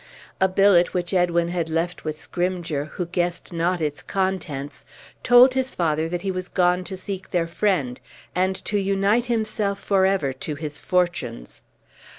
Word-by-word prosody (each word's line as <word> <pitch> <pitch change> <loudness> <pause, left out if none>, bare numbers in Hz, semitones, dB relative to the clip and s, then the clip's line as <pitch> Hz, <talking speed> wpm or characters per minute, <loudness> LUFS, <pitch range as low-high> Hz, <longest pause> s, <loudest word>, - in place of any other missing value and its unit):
A 190 - +4
billet, 185 -2 +4
which 180 +1 -2
Edwin 170 -2 +2
had 170 -2 -2
left 165 +2 -2
with 155 -1 -3
Scrymgeour, 175 -5 -2
who 180 - -3
guessed 175 0 -2
not 170 +2 0
its 150 -2 -2
contents, 185 -8 -3 0.4
told 245 +1 +7
his 260 0 -1
father 160 -1 0
that 175 +1 -3
he 195 - 0
was 185 -1 -4
gone 180 0 +2
to 190 - -5
seek 190 0 -6
their 175 -3 +1
friend, 165 -7 -1 0.3
and 185 +1 +1
to 205 - 0
unite 200 +4 +2
himself 215 -4 -1
forever 190 -8 +2
to 150 +3 -5
his 150 0 -5
fortunes. 175 - -2
180 Hz, 160 wpm, -23 LUFS, 165-195 Hz, 0.4 s, told